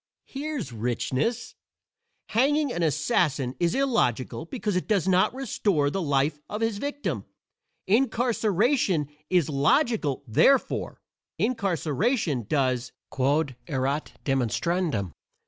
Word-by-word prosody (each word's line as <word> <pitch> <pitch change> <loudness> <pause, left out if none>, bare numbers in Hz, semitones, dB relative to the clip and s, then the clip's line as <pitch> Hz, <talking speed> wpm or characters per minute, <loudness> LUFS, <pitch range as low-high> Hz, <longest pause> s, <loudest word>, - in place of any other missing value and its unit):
Here's 275 - -5
richness! 125 - -2 0.8
Hanging 280 +3 +2
an 175 - -2
assassin 150 -3 +1
is 170 -1 +1
illogical 225 - 0
because 210 0 -3
it 180 - -1
does 200 -4 +1
not 185 0 +4
restore 200 - 0
the 195 - -2
life 145 -1 +1
of 210 - -4
his 225 -3 0
victim; 200 - -3 0.6
incarceration 220 - +2 0.2
is 180 -5 +3
logical; 150 - +1
therefore, 265 - +2 0.4
incarceration 185 - 0
does 130 -4 0 0.2
_quod, 140 +2 +1
erat 140 0 -2
demonstrandum. 135 - 0
170 Hz, 100 wpm, -26 LUFS, 140-225 Hz, 0.8 s, not